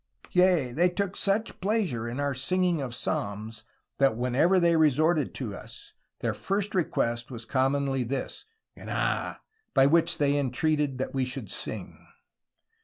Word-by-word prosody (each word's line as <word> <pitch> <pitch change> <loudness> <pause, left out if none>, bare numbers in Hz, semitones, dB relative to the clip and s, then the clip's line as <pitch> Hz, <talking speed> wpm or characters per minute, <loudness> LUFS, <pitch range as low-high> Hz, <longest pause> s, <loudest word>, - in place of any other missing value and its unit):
Yea 180 -8 +3
they 170 +8 +3
tooke 200 +1 -2
such 205 +3 0
pleasure 185 - 0
in 120 +4 -5
our 145 -1 0
singing 175 +4 +1
of 125 -3 -4
Psalmes, 110 +1 -3 0.4
that 135 -5 +4
whensoeuer 125 +10 +3
they 170 -1 +4
resorted 155 0 +3
to 125 -6 -4
vs, 100 - -11 0.3
their - - 0
first 200 +1 -2
request 120 -9 0
was 120 -3 -7
commonly 135 +1 +1
this, 130 - -4 0.3
Gnaah, - - -2 0.3
by 135 -1 +6
which 165 +4 +3
they 145 -1 +2
intreated 145 +1 0
that 130 - -3
we 130 -2 0
would - - -7
sing. - - -5
140 Hz, 145 wpm, -27 LUFS, 125-175 Hz, 0.4 s, by